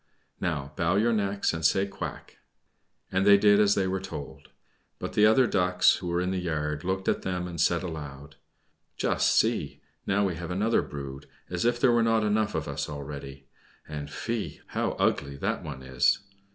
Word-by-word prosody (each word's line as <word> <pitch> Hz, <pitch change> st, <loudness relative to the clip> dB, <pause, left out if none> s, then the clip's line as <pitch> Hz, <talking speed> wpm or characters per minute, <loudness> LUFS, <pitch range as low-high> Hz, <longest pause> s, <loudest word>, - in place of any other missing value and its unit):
Now 75 Hz, -5 st, -2 dB
bow 85 Hz, +3 st, +1 dB
your 115 Hz, +4 st, +3 dB
necks, 100 Hz, -3 st, 0 dB
and 80 Hz, 0 st, -4 dB
say, 95 Hz, +5 st, +3 dB
'Quack.'" 100 Hz, -, -7 dB, 0.7 s
And 95 Hz, +1 st, +2 dB
they 100 Hz, 0 st, +7 dB
did 105 Hz, 0 st, +5 dB
as 105 Hz, -1 st, +4 dB
they 95 Hz, -, +1 dB
were 95 Hz, +1 st, -1 dB
told. 90 Hz, -7 st, -8 dB, 0.5 s
But -, -, -5 dB
the 105 Hz, 0 st, +5 dB
other 125 Hz, +4 st, +5 dB
Ducks, 90 Hz, -4 st, +3 dB
who 90 Hz, -, -6 dB
were 85 Hz, 0 st, 0 dB
in 90 Hz, +1 st, -1 dB
the 95 Hz, -, -1 dB
yard, 75 Hz, -3 st, -2 dB
looked 95 Hz, +1 st, -2 dB
at -, -, +1 dB
them 90 Hz, -1 st, -3 dB
and 85 Hz, -2 st, -4 dB
said 85 Hz, +1 st, +2 dB
aloud, 75 Hz, -4 st, -7 dB, 0.6 s
"Just -, -, +2 dB
see! -, -, +1 dB, 0.3 s
Now 100 Hz, +1 st, +2 dB
we 95 Hz, -, 0 dB
have 85 Hz, 0 st, -6 dB
another 105 Hz, +6 st, +2 dB
brood, 70 Hz, -1 st, -8 dB, 0.2 s
as 90 Hz, +2 st, -1 dB
if 120 Hz, 0 st, +2 dB
there 125 Hz, 0 st, +4 dB
were 120 Hz, 0 st, +3 dB
not 115 Hz, -1 st, +2 dB
enough 105 Hz, 0 st, +1 dB
of -, -, -2 dB
us -, -, -3 dB
already. 70 Hz, -2 st, -7 dB, 0.4 s
And 75 Hz, -1 st, -6 dB
fie! 115 Hz, +7 st, -4 dB
how -, -, -1 dB
ugly 70 Hz, 0 st, 0 dB
that -, -, -2 dB
one 65 Hz, -, -7 dB
is. 65 Hz, -1 st, +2 dB
90 Hz, 190 wpm, -27 LUFS, 75-100 Hz, 0.7 s, they